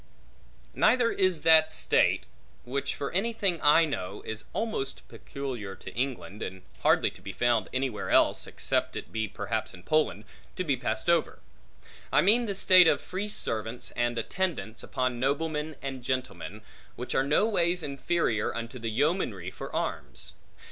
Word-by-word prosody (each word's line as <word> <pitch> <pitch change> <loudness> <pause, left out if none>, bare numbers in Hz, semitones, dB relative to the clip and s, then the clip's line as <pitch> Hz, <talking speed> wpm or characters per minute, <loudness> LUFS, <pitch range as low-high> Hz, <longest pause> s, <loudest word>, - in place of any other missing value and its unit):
Neither 245 -2 +3
is 185 -5 +2
that 160 -1 +6
state - - +3 0.4
(which, 135 +3 -3
for 140 - -4
any 215 +6 0
thing 195 -6 0
I 150 +3 +6
know, 100 -10 -5
is 110 0 -4
almost 215 -12 -3
peculiar 125 -8 -6
to - - -10
England, 120 -5 -3
and 95 0 -6 0.2
hardly - - +3
to - - -16
be - - -6
found 120 -3 +1
anywhere 130 -4 -2
else, - - +3
except - - -1
it - - -6
be 110 -1 -1
perhaps 110 +1 -3
in 90 - -15
Poland) 150 - +1 0.3
to 185 - -2
be 145 -6 +1
passed 110 -1 -2
over; 170 -2 +2 0.7
I - - +5
mean 230 +5 +4
the 200 - -2
state 185 -2 +7
of - - +4
free 195 +3 -4
servants, 115 - -2
and 120 0 -1
attendants 115 - -2
upon 130 -2 -2
noblemen 150 +3 -1
and 135 -2 -4
gentlemen; 110 -7 -4 0.3
which 125 - -5
are 135 - +3
no 150 +10 +3
ways 175 -4 +1
inferior 140 -5 -1
unto 115 +2 -5
the 115 0 -3
yeomanry 110 - 0
for - - -8
arms. - - -4
135 Hz, 160 wpm, -28 LUFS, 115-170 Hz, 0.7 s, state